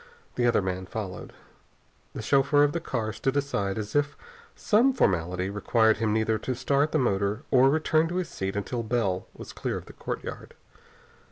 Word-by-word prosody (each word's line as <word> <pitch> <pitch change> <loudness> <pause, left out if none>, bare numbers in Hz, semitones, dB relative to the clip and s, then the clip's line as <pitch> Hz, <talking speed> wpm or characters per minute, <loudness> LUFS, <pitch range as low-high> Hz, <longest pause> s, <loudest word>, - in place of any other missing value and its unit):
The 120 -1 +1
other 115 -4 +3
man 95 0 -3
followed. 95 -3 -6 0.8
The 110 - -5
chauffeur 140 +4 +4
of 145 - +3
the 170 - -1
car 115 -8 -3
stood 135 +3 -1
aside 100 -9 -1
as 105 +2 -5
if 145 0 +1 0.4
some 240 +5 +3
formality 90 - +1
required 110 +2 +2
him 110 0 0
neither 110 0 +1
to 130 +4 -3
start 140 +4 +1
the - - +2
motor 105 -2 0
or 130 0 +6
return 155 +2 +2
to 175 - -5
his 180 -2 -1
seat 95 +1 -4
until 115 +4 -2
Bell 110 -5 -1
was - - -10
clear - - -3
of - - -9
the - - -13
courtyard. - - -6
115 Hz, 180 wpm, -27 LUFS, 100-145 Hz, 0.8 s, or